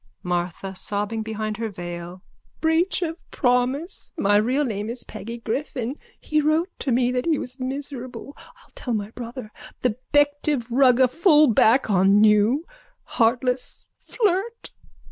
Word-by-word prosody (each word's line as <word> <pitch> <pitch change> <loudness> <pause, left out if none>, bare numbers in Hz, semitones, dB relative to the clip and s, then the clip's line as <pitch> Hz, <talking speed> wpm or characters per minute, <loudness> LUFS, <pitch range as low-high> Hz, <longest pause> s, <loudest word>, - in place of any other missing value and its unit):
MARTHA: 180 +2 -3
(Sobbing 205 +3 -2
behind 215 -1 -4
her 225 -1 -3
veil.) 175 -1 -7 0.4
Breach 330 +3 +2
of 330 0 -4
promise. 255 +8 0
My 205 -7 +3
real 255 +7 +1
name 210 -3 -3
is 240 +1 -6
Peggy 230 +2 -7
Griffin. 250 +2 -4 0.2
He 305 0 0
wrote 315 +5 +1
to 270 - -2
me 245 +1 +2
that 250 +4 -1
he 320 -3 +3
was 255 +1 -7
miserable. 265 0 -6
I'll - - -19
tell 245 -3 -3
my 205 0 -4
brother, 235 -2 -8 0.3
the 245 -3 +1
Bective 290 -3 +2
rugger 255 0 +5
fullback, 275 - +4
on 195 +2 +5
you, 215 +8 +4 0.4
heartless 250 +2 0
flirt. 430 +1 -1
250 Hz, 135 wpm, -23 LUFS, 215-290 Hz, 0.4 s, rugger